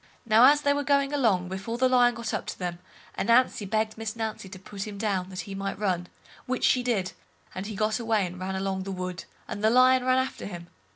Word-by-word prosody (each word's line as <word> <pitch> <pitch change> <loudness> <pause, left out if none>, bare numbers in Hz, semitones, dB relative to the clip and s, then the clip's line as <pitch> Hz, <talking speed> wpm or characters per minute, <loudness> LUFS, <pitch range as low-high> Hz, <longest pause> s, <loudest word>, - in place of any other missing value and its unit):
Now 225 +2 +6
as 290 +2 +6
they 285 - +3
were 285 0 -1
going 280 0 +2
along, 215 -10 +2
before 190 +5 -4
the 260 +1 +3
Lion 245 -1 +4
got 230 -1 -4
up - - -3
to - - -5
them, 175 -2 -4 0.4
Ananzi 235 -3 +3
begged 220 0 -1
Miss 225 0 -4
Nancy 220 -4 -4
to 190 - -9
put 195 +2 -7
him 205 -1 -7
down, 195 -3 -1
that 185 -1 -5
he 200 - -8
might 195 0 -4
run, 185 -4 -1 0.4
which 255 0 -2
she 255 - +4
did, 220 -7 -1 0.4
and 190 +2 -5
he 215 - -6
got 215 +2 0
away 225 -4 +1
and 180 +1 -7
ran 190 +1 -3
along 190 0 -2
the 195 +1 -5
wood, 180 -2 -5 0.2
and 205 - -6
the 220 - +5
Lion 255 +2 +5
ran 255 0 +3
after 260 -5 -2
him. 175 -3 -9
215 Hz, 235 wpm, -27 LUFS, 190-245 Hz, 0.4 s, Now